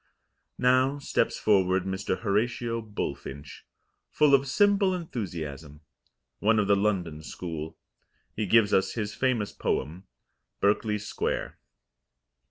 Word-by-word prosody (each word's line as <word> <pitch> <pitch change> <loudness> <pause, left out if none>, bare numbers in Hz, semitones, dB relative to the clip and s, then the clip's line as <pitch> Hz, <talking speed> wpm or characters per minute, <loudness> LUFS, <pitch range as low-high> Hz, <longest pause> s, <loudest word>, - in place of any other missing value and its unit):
Now 130 +2 +3
steps 140 - 0
forward 95 -3 +3
Mr. 95 +1 -2
Horatio 115 +2 0
Bullfinch, 75 -9 -6 0.4
full 150 -2 +3
of 140 0 +4
simple 200 +4 +3
enthusiasm, 80 - -6 0.6
one 110 +2 +3
of 105 - +3
the 100 - +5
London 95 -6 -1
school. 80 -1 -6 0.6
He 105 -2 -2
gives 110 +1 +4
us 95 0 +2
his 105 -2 -3
famous 120 -3 0
poem, 85 +8 -3 0.5
"Berkeley 105 +1 +2
Square." 105 0 -3
105 Hz, 110 wpm, -27 LUFS, 90-120 Hz, 0.6 s, the